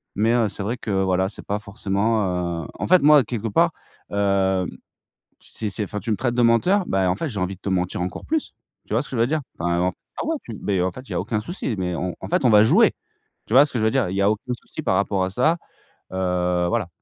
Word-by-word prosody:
Mais, 110 +3 +2
heu, 120 -3 +3
c'est 100 - -6
vrai 115 +5 -2
que 110 - -5
voilà 95 0 +1
c'est 100 - -9
pas 105 +1 -1
forcément, 100 -4 -1
heu - - -8
en - - -2
fait, 185 0 +6
moi, 150 -2 +7
quelque 115 0 -4
part, 100 - +3 0.4
heu, 95 -2 +1 0.8
c'est 110 - -6
c'est 105 +2 -2
enfin 105 +1 -5
tu 115 - -4
me 105 - +2
traites 120 +1 -1
de 125 - +1
menteur? 175 - +3
Ben 95 -1 +1
en 90 - 0
fait, 160 - -3
j'ai 110 -7 -5
envie 95 +1 -2
de 95 - -31
te - - -5
mentir 90 -1 -1
encore 90 - -5
plus. 315 -1 -2 0.3
Tu - - -8
vois - - +2
ce - - -11
que 130 - -4
je - - 0
veux 115 - +4
dire? 155 +4 0 0.2
Enfin 85 +1 0
non 90 +1 +1 0.2
clairement 320 0 -2
tu 115 - -7
beh 95 -3 -1
en 90 - +1
fait, 130 - -9
il - - -7
y - - -2
a - - 0
aucun 105 -3 -2
souci, 125 - -3
mais 90 -1 -1
on, 90 +1 -3
en 95 - -6
fait, - - +1
on - - +5
va 105 -1 +7
jouer. - - +5 0.6
Tu - - -4
vois 135 +3 +8
ce 150 - -7
que 120 - 0
je - - 0
veux - - +4
dire? 120 -7 +1
Il 95 - -4
y 100 - +1
a 100 - +4
aucun 110 +4 -2
souci - - -8
par 95 - +1
rapport 100 0 +1
à 95 - -1
ça. 125 - +3 0.6
Heu, 90 -1 0
voilà. 115 -6 0
105 Hz, 275 wpm, -23 LUFS, 95-120 Hz, 0.8 s, vois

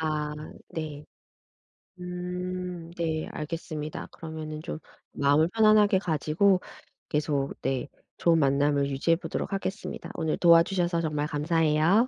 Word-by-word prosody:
아 150 -1 -1 0.4
네. 155 -2 -5 1.0
음 180 0 -4 0.5
네 160 -2 -1
알겠습니다. 155 -1 -5
그러면은 155 -1 -6
좀 160 -1 -5 0.3
마음을 145 +4 +3
편안하게 215 -3 +5
가지고 180 +3 +2 0.5
계속 145 -2 0
네 135 +1 -1 0.3
좋은 165 -1 +4
만남을 140 0 +2
유지해 140 +5 +2
보도록 185 - -4
하겠습니다. 195 +1 -4
오늘 160 -2 -1
도와주셔서 170 0 +4
정말 150 -2 -1
감사해요. 160 +7 +3
160 Hz, 280 characters per minute, -27 LUFS, 150-175 Hz, 1.0 s, 편안하게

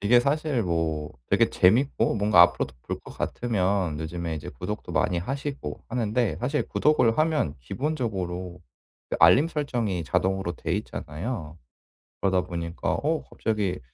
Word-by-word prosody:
이게 120 +4 +5
사실 145 -2 0
뭐 80 -4 -1 0.2
되게 - - +3
재밌고 120 +10 +3
뭔가 105 +1 +5
앞으로도 65 - +2
볼 - - -4
것 - - -11
같으면 95 -8 0
요즘에 80 +1 -4
이제 75 - -6
구독도 - - -6
많이 90 - +1
하시고 135 - -4
하는데 115 -6 0
사실 140 - -1
구독을 135 -7 +3
하면 155 - +2
기본적으로 95 - -3 0.5
그 - - -1
알림 150 +5 +7
설정이 120 - -2
자동으로 95 +4 0
돼 - - -4
있잖아요. 80 - -5 0.6
그러다 95 -2 +2
보니까 85 -1 -3
어 155 +2 0
갑자기 105 -5 -1
100 Hz, 320 characters per minute, -26 LUFS, 85-125 Hz, 0.6 s, 알림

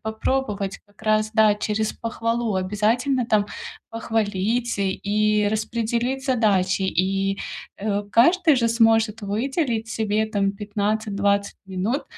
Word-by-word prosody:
попробовать. 220 -3 -2
Как 205 +1 -23
раз, 215 0 +2
да, 215 -1 +5
через 215 +1 -1
похвалу. 230 -1 -2
Обязательно 225 +7 0
там 210 -3 +2 0.4
похвалить 225 +1 -1
и 210 +2 +1
распределить 235 +4 -1
задачи. 200 -7 +2
И, 195 +2 0 0.4
э, 205 0 -1
каждый 320 +5 +4
же 235 -1 +2
сможет 225 -1 +3
выделить 230 - -1
себе, 220 -1 0
там, 200 -2 0
15-20 205 0 -1
минут 195 +9 -2
215 Hz, 110 wpm, -23 LUFS, 200-230 Hz, 0.4 s, да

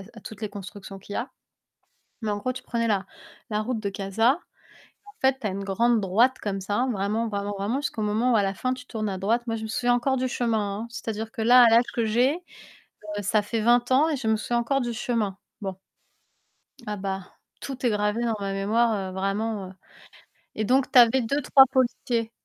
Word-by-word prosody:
s 195 - -12
à 225 - -11
toutes 215 +1 -10
les 215 - -1
constructions 195 0 -9
qu'il 200 +1 -11
y - - -2
a. 245 - -3 0.9
Mais 215 - -1
en 205 - 0
gros, 255 +5 -2
tu 255 - -8
prenais 230 -1 -1
la 195 -2 0 0.4
la 210 0 0
route 235 -1 -2
de 200 - -2
Casa. 215 - +1 0.7
Et - - -30
en 410 - -14
fait, 265 0 +3
tu 215 - -2
as - - -2
une 195 +1 -4
grande 225 +4 +2
droite 225 +7 +3
comme 195 -2 -2
ça, 205 +6 0
vraiment, 210 +3 -1
vraiment, 205 0 -3
vraiment 210 +7 -1
jusqu'au 250 -5 -3
moment 220 +4 +1
où - - +4
à 205 - +4
la 195 0 0
fin, 255 +6 -1
tu 250 -1 -9
tournes 215 -2 -3
à 190 - -3
droite. 230 +5 0
Moi, 225 - -1
je 220 - -5
me - - -4
souviens 245 +2 +1
encore 265 +2 +1
du 255 +1 0
chemin, 220 -5 -1
hein. - - -7
C'est-à-dire 225 -1 -5
que 230 - -5
là, 245 +3 +7
à 235 - +7
l'âge 230 +2 +5
que 230 -2 0
j'ai, 245 +7 +2
heu, 355 0 -14 0.6
ça 210 +2 +2
fait 220 +2 -2
20 240 +2 +3
ans 295 +5 +4
et 295 - -1
je 235 -4 -4
me 220 - +4
souviens 240 +2 -1
encore 275 +3 0
du 240 -1 -2
chemin. 220 -4 -2 0.2
Bon 195 -2 -4 1.1
ah 210 0 -3
bah, 190 -1 -5 0.3
tout 265 -2 -7
est - - +3
gravé 210 +2 0
dans 230 -2 0
ma 195 -1 -2
mémoire, 220 +4 +2 0.2
heu, - - -9
vraiment, 195 +1 -2
heu, - - -11 0.8
et 215 - -1
donc 255 +4 +2
tu 270 - +4
avais 240 +2 +6
2-3 270 +2 +5
policiers. 240 -3 0
225 Hz, 230 wpm, -25 LUFS, 205-245 Hz, 1.1 s, là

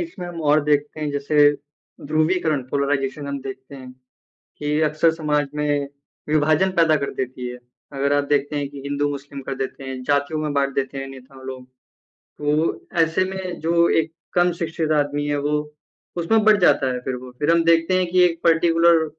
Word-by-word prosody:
इसमें 270 - -6
हम 170 -2 -7
और 150 +1 +5
देखते 150 +1 0
हैं 150 -1 -2
जैसे 145 +1 +4 0.6
ध्रुवीकरण, 155 -2 +1
पोलराइजेशन 140 0 -1
हम 140 -1 -4
देखते 130 +1 -9
हैं 130 -1 -10 0.7
कि 150 +1 0
अक्सर 155 +2 +3
समाज 150 -3 0
में 145 -1 0 0.4
विभाजन 155 +4 +3
पैदा 160 -2 +4
कर 140 -1 -3
देती 125 -1 -4
है। 125 - -7 0.4
अगर 140 +1 0
आप 145 0 +2
देखते 145 0 +1
हैं 140 -1 -2
कि 140 -1 -10
हिंदू-मुस्लिम 140 -1 -3
कर 135 - -4
देते 135 0 -5
हैं, 130 -1 -6
जातियों 145 +3 0
में 150 -1 -2
बाँट 140 -1 0
देते 135 0 -2
हैं 135 - -5
नेताओं 130 0 -13
लोग। 130 -1 -7 0.5
तो 150 +2 -2 0.2
ऐसे 165 +3 +1
में 185 -2 -5
जो 170 +1 +3
एक 160 +1 -8 0.2
कम 175 0 +3
शिक्षित 160 -1 -2
आदमी 145 0 -2
है 145 0 0
वो 145 +1 -1 0.6
उसमें 215 +6 +2
बँट 215 -1 +5
जाता 135 -6 +4
है 125 - -3
फिर 130 -1 -2
वो। 125 - -10
फिर 150 +3 +2
हम 170 0 +3
देखते 165 +2 +3
हैं 185 -1 +1
कि 180 -1 +5
एक 170 -1 0
पार्टिकुलर 165 0 +4
150 Hz, 185 wpm, -22 LUFS, 140-165 Hz, 0.7 s, और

